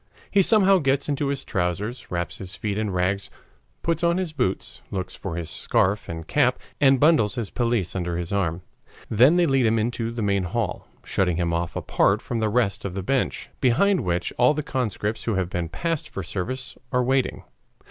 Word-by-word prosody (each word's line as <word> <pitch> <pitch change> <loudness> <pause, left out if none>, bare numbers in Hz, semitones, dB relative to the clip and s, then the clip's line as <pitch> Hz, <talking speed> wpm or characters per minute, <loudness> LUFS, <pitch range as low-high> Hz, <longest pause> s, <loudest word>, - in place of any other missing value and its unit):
He 200 - +5
somehow 195 -1 +5
gets 140 -2 +1
into 145 -1 0
his 140 0 -2
trousers, 95 +6 -2
wraps 85 -1 -3
his 95 -1 -7
feet 105 -2 -3
in 110 -1 -1
rags, 95 +2 -1 0.5
puts 165 0 0
on 170 +1 +3
his 180 -4 -2
boots, 125 -10 -2
looks 95 -1 -4
for 80 - -5
his 85 -2 -4
scarf 100 +3 0
and 80 -1 -6
cap, - - +2 0.2
and 135 -2 +5
bundles 145 -9 +4
his 115 -6 -3
pelisse 115 -8 0
under 90 -2 -2
his 90 +3 -4
arm. 90 -3 -1 0.5
Then 125 +9 +6
they 175 -1 +4
lead 135 -5 +3
him 110 +1 +2
into 115 +1 -1
the 115 -1 -3
main 100 -2 +1
hall, 110 0 -3 0.2
shutting 90 -4 0
him 85 -1 0
off 85 0 -2
apart 100 +2 +2
from 115 +1 -3
the 110 -1 +1
rest 105 -2 +1
by 100 - -3
a 95 +1 -5
bench, 135 +6 -1
behind 180 +10 +3
which 85 -1 -1
all 125 +5 +5
the 150 - -2
conscripts 110 -5 -2
who 115 - 0
have 95 -1 -1
been 85 -2 -2
passed 165 - -2
for 95 - -5
service 125 +10 -4
are 125 -1 +2
waiting. 130 +1 0
110 Hz, 200 wpm, -24 LUFS, 95-135 Hz, 0.5 s, Then